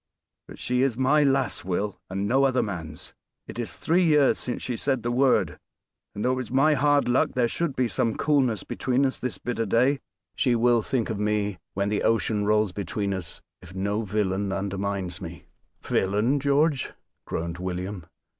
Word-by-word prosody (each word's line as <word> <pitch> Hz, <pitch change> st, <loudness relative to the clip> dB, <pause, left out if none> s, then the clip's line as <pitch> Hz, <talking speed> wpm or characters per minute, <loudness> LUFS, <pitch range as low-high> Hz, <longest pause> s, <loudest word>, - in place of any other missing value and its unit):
But -, -, -11 dB
she 125 Hz, 0 st, 0 dB
is 130 Hz, -4 st, +1 dB
my 135 Hz, +4 st, +4 dB
lass, 135 Hz, -2 st, +1 dB
Will, 95 Hz, +3 st, -2 dB
and 95 Hz, +2 st, -2 dB
no 135 Hz, +4 st, +3 dB
other 130 Hz, -2 st, +3 dB
man's. 85 Hz, -7 st, -7 dB, 0.3 s
It -, -, -8 dB
is -, -, -3 dB
three 175 Hz, +3 st, +1 dB
years 150 Hz, -4 st, +4 dB
since 125 Hz, -, -4 dB
she 125 Hz, -, -2 dB
said 130 Hz, -1 st, -1 dB
the 120 Hz, -, -1 dB
word. 130 Hz, +2 st, +2 dB, 0.6 s
And 105 Hz, -, -3 dB
though 125 Hz, -, +3 dB
it -, -, +1 dB
was 130 Hz, -4 st, -4 dB
my 140 Hz, +4 st, +4 dB
hard 145 Hz, 0 st, +3 dB
luck 125 Hz, +1 st, +2 dB
there 125 Hz, -2 st, +3 dB
should 160 Hz, +3 st, -2 dB
be 125 Hz, -1 st, +1 dB
some 115 Hz, -1 st, 0 dB
coolness 130 Hz, -9 st, +1 dB
between 130 Hz, +2 st, 0 dB
us 130 Hz, -, -1 dB
this 125 Hz, -2 st, -3 dB
bitter 115 Hz, -2 st, -3 dB
day, 130 Hz, +7 st, +3 dB, 0.4 s
she 125 Hz, -3 st, +2 dB
will 120 Hz, 0 st, +3 dB
think 115 Hz, 0 st, -1 dB
of 105 Hz, -, -3 dB
me 105 Hz, -3 st, 0 dB, 0.2 s
when 100 Hz, +1 st, 0 dB
the 105 Hz, -, 0 dB
ocean 110 Hz, -2 st, +1 dB
rolls 105 Hz, -1 st, +2 dB
between 100 Hz, +1 st, -3 dB
us 90 Hz, -4 st, -6 dB, 0.2 s
if 90 Hz, 0 st, -13 dB
no 100 Hz, +3 st, -1 dB
villain 100 Hz, -2 st, -1 dB
undermines 100 Hz, -1 st, -3 dB
me 85 Hz, -1 st, -8 dB, 0.2 s
" -, -, -46 dB
"Villain! 105 Hz, +9 st, +1 dB
George!" 140 Hz, 0 st, +1 dB, 0.3 s
groaned 85 Hz, +1 st, -4 dB
William. 90 Hz, -1 st, -4 dB
115 Hz, 185 wpm, -26 LUFS, 100-130 Hz, 0.6 s, my